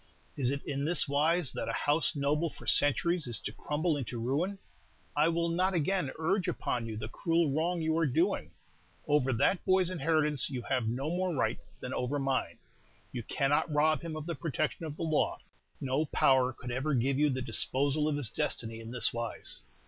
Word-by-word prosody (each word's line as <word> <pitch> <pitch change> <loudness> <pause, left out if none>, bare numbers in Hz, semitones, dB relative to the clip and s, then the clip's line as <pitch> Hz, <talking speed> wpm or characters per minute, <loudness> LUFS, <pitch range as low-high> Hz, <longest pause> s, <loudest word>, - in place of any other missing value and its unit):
Is 130 -4 +1
it 140 +1 -2
in 140 0 -3
this 165 +2 +2
wise 150 +2 +2
that - - -4
a - - -2
house 150 +2 +2
noble 150 +3 +1
for - - -13
centuries 165 +3 +3
is 120 - -2
to - - -4
crumble 150 +7 -1
into 125 -4 -4
ruin? 145 +12 -1 0.6
I 150 +2 +4
will 170 0 +1
not 185 +3 +1
again 175 -1 0
urge 185 +4 0
upon 120 -8 -2
you 110 -1 -5
the 110 0 -5
cruel 165 +4 +1
wrong 165 +3 0
you 160 0 +1
are 165 - +2
doing. 170 +9 0 0.6
Over 145 -3 +2
that 170 - +2
boy's 185 -1 +2
inheritance 150 -4 +1
you 125 -3 -4
have 125 -4 -1
no 135 +7 -2
more 180 -1 -1
right - - 0 0.2
than - - -5
over 125 +3 -1
mine, 135 -1 -1 0.5
you 120 - -4
cannot 140 +7 0
rob 155 +1 +3
him 165 -2 -5
of 155 -1 -5
the 170 - -3
protection 160 0 -2
of 150 0 -7
the - - -4
law. 155 -2 +1 0.4
No 135 +4 0
power 130 -3 +3
could 125 0 -8
ever 135 +4 0
give 130 +3 +1
you 150 0 +4
the 130 -2 -2
disposal 135 +5 +2
of 150 -1 0
his 130 -8 +3
destiny 115 -1 -1
in 115 0 -9
this 125 -1 +3
wise." 115 -1 -3
145 Hz, 195 wpm, -31 LUFS, 130-165 Hz, 0.6 s, I